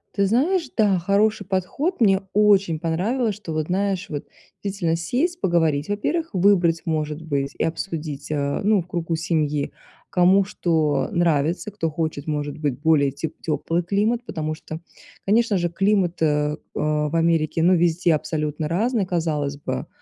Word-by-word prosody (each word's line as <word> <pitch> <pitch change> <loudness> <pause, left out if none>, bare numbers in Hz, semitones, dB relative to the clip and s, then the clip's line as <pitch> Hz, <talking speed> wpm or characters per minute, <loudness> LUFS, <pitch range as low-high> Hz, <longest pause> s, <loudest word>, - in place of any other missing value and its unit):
Ты 200 -1 +2
знаешь, 290 - +1
да, 200 -5 +3
хороший 205 +4 +2
подход. 225 - -1
Мне 195 -3 +4
очень 200 -6 +4
понравилось, 210 +9 0
что 200 -5 -8
вот, 155 -1 -1
знаешь, 190 0 -1
вот 145 0 -5 0.4
действительно 190 -5 -1
сесть, 280 - -1
поговорить, 160 -4 +1
во-первых. 315 +11 -1
Выбрать, 180 -3 +3
может 155 -1 -2
быть, 140 -3 -2
и - - 0
обсудить, 160 -3 -4
э, 140 +1 -1
ну, 205 -3 +3
в - - -23
кругу 170 -2 -2
семьи, 155 -3 -1 0.4
кому 185 +2 +5
что 160 -6 0
нравится. 170 +3 +1
Кто 175 -5 -2
хочет, 155 -2 -3
может 145 -1 -2
быть, 145 -5 -1
более 150 -3 +3
теп 145 +4 -5
теплый 165 +2 -1
климат, 215 +6 0
потому 155 -8 -3
что, 155 +1 -8 0.4
конечно 215 0 +3
же, 175 -1 0
климат, 195 -2 +1
э, - - +5
э, 150 0 +1 0.2
в 150 0 0
Америке, 165 -1 +2
ну, 180 +2 +5
везде 170 0 +2
абсолютно 155 0 -2
разный. 205 +4 0
Казалось 150 -5 -1
бы, 130 +1 -4
170 Hz, 155 wpm, -23 LUFS, 155-200 Hz, 0.4 s, кому